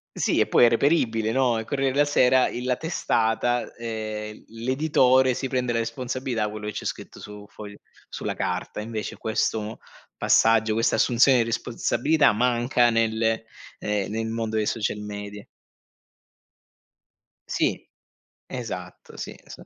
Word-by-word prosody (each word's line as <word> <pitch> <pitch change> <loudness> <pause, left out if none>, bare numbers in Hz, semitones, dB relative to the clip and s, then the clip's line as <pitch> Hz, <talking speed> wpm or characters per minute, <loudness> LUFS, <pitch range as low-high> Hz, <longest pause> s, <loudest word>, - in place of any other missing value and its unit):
Sì, - - +1
e - - +3
poi 120 - +5
è - - +6
reperibile, 115 -4 +1
no, 125 -2 +2
Il 110 - -4
Corriere 135 +2 0
della 145 +2 +3
Sera, 130 -3 +4
il 125 - -5
la 125 -1 +1
testata, 120 -6 0
ehm, 110 -2 -5
l'editore 130 +2 +2
si 135 +2 -3
prende 125 -2 -1
la 115 - 0
responsabilità, 115 -1 -2
quello 105 0 -7
che 105 - -3
c'è - - -6
scritto - - -6
su 105 0 -10
foglio 105 -1 -11 0.3
sulla - - -4
carta; 105 - -3
invece 110 -1 -5
questo 110 0 -2 0.4
passaggio, 110 -1 +3
questa 115 +2 +2
assunzione 125 +2 +4
di 115 - +3
responsabilità 125 +5 +1
manca 120 +1 +2
nel 115 -1 +1 0.4
ehm, 105 -2 -2
nel 110 +1 -2
mondo 110 -1 -3
dei 110 - +1
social 105 -1 -1
media. 105 0 -7 2.0
Sì. - - -1 0.6
Esatto, 90 -8 -7
sì, - - -6
esa - - -12
115 Hz, 140 wpm, -25 LUFS, 110-125 Hz, 2.0 s, è